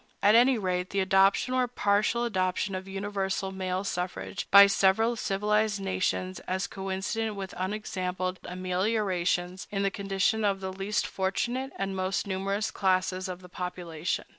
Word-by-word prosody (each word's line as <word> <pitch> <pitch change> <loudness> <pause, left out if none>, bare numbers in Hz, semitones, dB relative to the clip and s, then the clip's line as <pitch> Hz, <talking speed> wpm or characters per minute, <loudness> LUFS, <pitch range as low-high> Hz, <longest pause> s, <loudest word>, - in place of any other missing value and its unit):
At 205 - +6
any 245 +2 +6
rate, 180 -2 -1
the 200 - -1
adoption 195 +6 +3
or 255 -1 +2
partial 215 +1 +1
adoption 190 -2 -1
of 185 0 -5
universal 195 -1 -2
male 185 0 -2
suffrage 95 - -4
by 200 0 +10
several 200 +4 +3
civilized 210 0 0
nations 185 -1 -1
is 190 +1 0
coincident 195 +3 -3
with 195 -2 -6
unexampled 185 -1 -3
ameliorations 185 -1 -1
in 200 -1 -1
the 195 - +1
condition 195 +2 0
of 200 -2 +1
the 190 -1 -5
least 195 +2 -1
fortunate 240 +8 -2
and 195 0 -2
most 185 0 -1
numerous 195 +2 -1
classes 185 -1 0
of 180 0 -7
the - - -10
population. 180 -1 -4
195 Hz, 145 wpm, -28 LUFS, 185-205 Hz, -, by